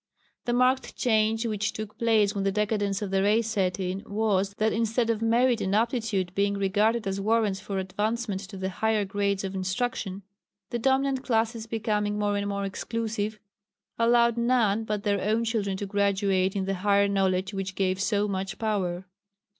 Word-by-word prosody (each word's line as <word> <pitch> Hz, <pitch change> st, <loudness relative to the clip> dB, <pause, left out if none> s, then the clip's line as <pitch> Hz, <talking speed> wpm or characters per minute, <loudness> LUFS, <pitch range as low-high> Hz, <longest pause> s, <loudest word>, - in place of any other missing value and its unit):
The 240 Hz, -, 0 dB
marked 255 Hz, +2 st, +2 dB
change 220 Hz, -1 st, +2 dB
which 210 Hz, -2 st, -1 dB
took 215 Hz, 0 st, -7 dB
place 220 Hz, -3 st, +3 dB
when 200 Hz, -2 st, -2 dB
the 195 Hz, -, +1 dB
decadence 205 Hz, 0 st, 0 dB
of 195 Hz, -, -4 dB
the 195 Hz, 0 st, +2 dB
race 215 Hz, +3 st, +3 dB
set 195 Hz, -4 st, 0 dB
in 185 Hz, +1 st, -2 dB
was, 200 Hz, -2 st, 0 dB
that 220 Hz, +1 st, +1 dB
instead 230 Hz, +1 st, +1 dB
of 225 Hz, -1 st, -2 dB
merit 235 Hz, +1 st, +3 dB
and 190 Hz, +1 st, 0 dB
aptitude 220 Hz, -5 st, 0 dB
being 200 Hz, +1 st, +1 dB
regarded 210 Hz, +3 st, +1 dB
as 195 Hz, 0 st, -2 dB
warrants 215 Hz, -2 st, +1 dB
for 195 Hz, 0 st, -5 dB
advancement 205 Hz, +2 st, -2 dB
to 195 Hz, -, -8 dB
the 190 Hz, 0 st, -2 dB
higher 220 Hz, +1 st, +1 dB
grades 200 Hz, 0 st, -1 dB
of 190 Hz, 0 st, -4 dB
instruction, 195 Hz, 0 st, -2 dB, 0.5 s
the 240 Hz, -, -1 dB
dominant 265 Hz, +1 st, +1 dB
classes 225 Hz, -1 st, 0 dB
becoming 210 Hz, -2 st, -1 dB
more 205 Hz, -1 st, 0 dB
and 200 Hz, 0 st, -1 dB
more 200 Hz, 0 st, -2 dB
exclusive 215 Hz, +1 st, -3 dB, 0.6 s
allowed 235 Hz, 0 st, +4 dB
none 235 Hz, -3 st, +2 dB
but 210 Hz, -1 st, -2 dB
their 200 Hz, -2 st, +1 dB
own 220 Hz, +3 st, +1 dB
children 210 Hz, -4 st, -1 dB
to 200 Hz, -, -4 dB
graduate 195 Hz, -1 st, +1 dB
in 195 Hz, -1 st, -1 dB
the 195 Hz, -, -1 dB
higher 200 Hz, 0 st, +4 dB
knowledge 190 Hz, -1 st, 0 dB
which 190 Hz, -1 st, -4 dB
gave 190 Hz, -1 st, 0 dB
so 205 Hz, 0 st, +1 dB
much 195 Hz, -1 st, -3 dB
power. 190 Hz, -5 st, -1 dB
205 Hz, 180 wpm, -27 LUFS, 195-225 Hz, 0.6 s, allowed